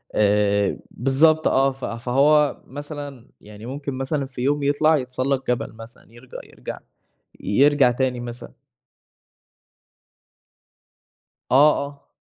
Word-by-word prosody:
آآ 100 -1 +2
بالضبط 155 +5 +3
آه 135 +1 +3
ف 135 0 -8
فهو 140 +5 +2
مثلًا 145 -3 -8
يعني 105 +1 -12
ممكن 140 +2 -5
مثلًا 135 +2 -2
في 130 -2 -8
يوم 145 +2 0
يطلع 155 +2 +3
يتسلّق 130 +1 -2
جبل 125 -3 -2
مثلًا 115 +1 -13
يرج 120 +2 -17
يرجع - - -9 0.6
يرجع 140 +3 +3
تاني 125 0 -1
مثلًا. 120 0 -8 3.0
آه 145 +4 +6 0.2
آه. 140 0 -16
135 Hz, 110 wpm, -22 LUFS, 120-145 Hz, 3.0 s, آه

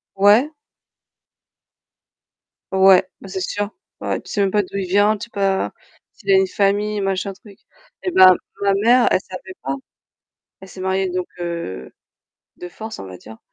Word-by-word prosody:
Ouais. 205 +8 +5 2.2
Ouais, 190 -1 +5
ben - - -10
c'est 190 0 -4
sûr. 205 +2 -2 0.3
Ouais, - - -2
tu - - -15
sais 205 - 0
même 195 -1 +2
pas 210 - +3
d'où 200 - -7
il 190 -2 -2
vient, 205 +3 +3
tu 210 - -7
sais - - -23
pas, 195 -1 0 0.4
s'il 395 - -3
a - - +7
une 385 0 +4
famille 205 - 0
machin 195 0 -1
truc. 200 0 -17 0.4
Eh 370 - -1
ben 185 - +8 0.3
ma 200 -1 +3
mère, 240 +2 +5
elle - - +4
savait 190 -1 -10
pas. 135 +1 -2 0.9
Elle 190 - -12
s'est 190 - -11
mariée 190 0 0
donc 180 0 -2
heu, 170 - -5 0.7
de 180 - -8
force 220 +4 -8
on - - -7
va 95 -1 -10
dire 110 +3 -13
195 Hz, 175 wpm, -20 LUFS, 185-205 Hz, 2.2 s, ben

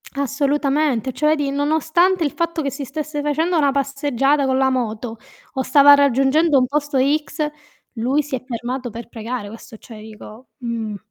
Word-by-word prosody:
Assolutamente. 280 -2 0
Cioè 305 +3 +2
di 290 -2 -2
nonostante 320 +5 +1
il 290 - 0
fatto 335 +1 -2
che 280 -2 -2
si 275 0 -6
stesse 300 +2 -4
facendo 320 +4 0
una 285 -3 +3
passeggiata 275 0 0
con 260 0 +1
la 265 0 +3
moto 230 -2 -3 0.4
o 265 - -1
stava 280 +2 +7
raggiungendo 280 +3 +3
un 255 - +3
posto 290 +1 -1
x, 300 +3 0 0.5
lui 260 +5 0
si 285 -2 -4
è 255 - -7
fermato 245 +1 -4
per 235 +1 -9
pregare, 230 -1 -5
questo 225 +1 -12
cioè 220 0 -12
dico 220 +2 -12
mh. 230 -4 -4
275 Hz, 165 wpm, -20 LUFS, 245-295 Hz, 0.5 s, stava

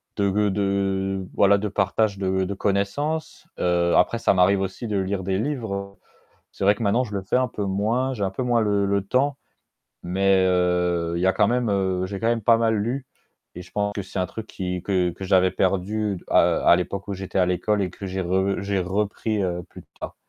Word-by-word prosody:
de 100 -1 +1 0.2
g - - 0
de, 95 -1 -1
voilà, 100 0 +4
de 105 - -2
partage 100 +1 0
de 95 0 0
de 100 +2 -3
connaissance, 105 +12 -2
heu, 85 -1 +2
après, 115 +6 +3
ça 100 - +2
m'arrive 95 +2 +4
aussi 95 +5 -4
de 105 -2 -1
lire 95 0 -2
des 95 +1 -1
livres. 100 -7 -4 0.5
C'est - - -5
vrai 100 +1 +5
que 105 - -7
maintenant, 115 +5 +2
je 105 -3 -8
le 95 - -2
fais 95 - 0
un 130 - +2
peu 105 - -5
moins, 110 +7 0
j'ai 105 -6 -2
un 95 - -1
peu 115 - -3
moins 120 -2 +2
le 100 -2 +1
le 100 0 +1
temps 135 +5 +1 0.7
mais 95 +1 +2
heu, 90 -2 +1
il - - -2
y 95 - +1
a 95 - +4
quand - - +3
même 120 -1 0
heu, 95 -2 0
j'ai 100 +1 -5
quand 115 - 0
même 115 -2 0
pas 115 0 +5
mal 115 -1 +2
lu 125 +6 -2 0.5
et 90 - -7
je 90 - -18
pense 105 0 -1
que 100 - -3
c'est 95 - -5
un 90 - 0
truc 110 +3 -7
qui 90 -4 -5
que 90 -3 +1
que 95 - -8
j'avais 95 -1 +4
perdu, 100 +3 -1
heu, - - 0
à - - +5
l'époque 95 +2 -4
où 100 - -3
j'étais 95 0 -3
à 90 - +3
l'école 100 +3 0
et 95 - -1
que 100 - -9
j'ai 95 0 -3
re 95 +2 0
j'ai 100 0 -1
repris, 105 +3 -1
heu, 90 -1 -2
plus - - -13 0.2
tard. - - -6
100 Hz, 230 wpm, -23 LUFS, 95-105 Hz, 0.7 s, vrai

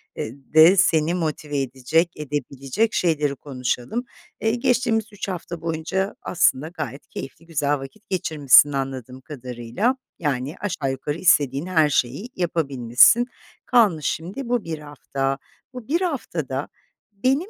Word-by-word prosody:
eee, 110 - -4 0.2
de 160 +5 +8
seni 165 -3 +3
motive 155 -4 -2
edecek, 135 +6 0
edebilecek 145 - -2
şeyleri 150 -5 +1
konuşalım. 130 - -3 0.4
Eee, 225 +1 +2
geçtiğimiz 235 -2 +1
3 205 - -5
hafta 175 -2 -5
boyunca 165 +4 -2
aslında 155 -4 +2
gayet 150 -6 -7
keyifli, 135 +5 -8
güzel 145 -3 0
vakit 205 +11 -11
geçirmişsin, 150 -6 +5
anladığım 130 -2 -4
kadarıyla. 130 - -2 0.2
Yani, 145 -1 -2
aşağı 175 -9 -2
yukarı 145 +3 -3
istediğin 145 -4 +3
her 160 -5 +3
şeyi 140 - -1
yapabilmişsin. 155 - +4 0.4
Kalmış 205 - +3
şimdi 200 +11 -4
bu 245 -3 +1
1 160 -2 -5
hafta. 135 -2 -3 0.4
Bu 250 -3 -9
bir 335 +5 +1
haftada 160 - -2 0.4
benim 265 - 0
155 Hz, 125 wpm, -23 LUFS, 135-195 Hz, 0.4 s, de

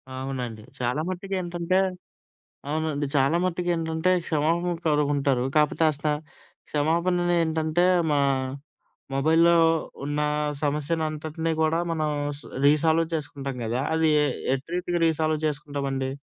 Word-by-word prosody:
అవునండి. 130 -4 -4 0.2
చాలా 125 +4 0
మట్టుకేంటంటే 185 -1 -2 0.9
అవునండి. 155 -1 -1
చాలా 140 +4 +3
మట్టుకేంటంటే 170 -1 0 0.2
క్షమాపణ 165 +3 +1
కోరుకుంటారు. 145 -4 +2
కాకపోతే 150 +2 +3
అసల 150 +1 -4 0.6
క్షమాపణలు 175 +4 +1
ఏంటంటే, 160 +1 0 0.3
మా 145 - +2 1.0
మొబైల్‌లో 160 +5 +4 0.5
ఉన్న 145 +1 -2 0.4
సమస్యలంతటిని 155 +2 -1
కూడా 160 +1 +2
మనం 155 -2 0 0.3
స - - -9 0.2
రీసాల్వ్ 160 +3 +4
చేసుకుంటాం 140 -3 -4
గదా! 120 +3 -1
అది 160 0 +3 0.5
ఎటి 135 +1 -8
రీతిగా 175 -1 -1
రీసాల్వ్ 155 -1 +1
చేసుకుంటామండి? 140 -3 -2
155 Hz, 100 wpm, -25 LUFS, 145-165 Hz, 1.0 s, మొబైల్‌లో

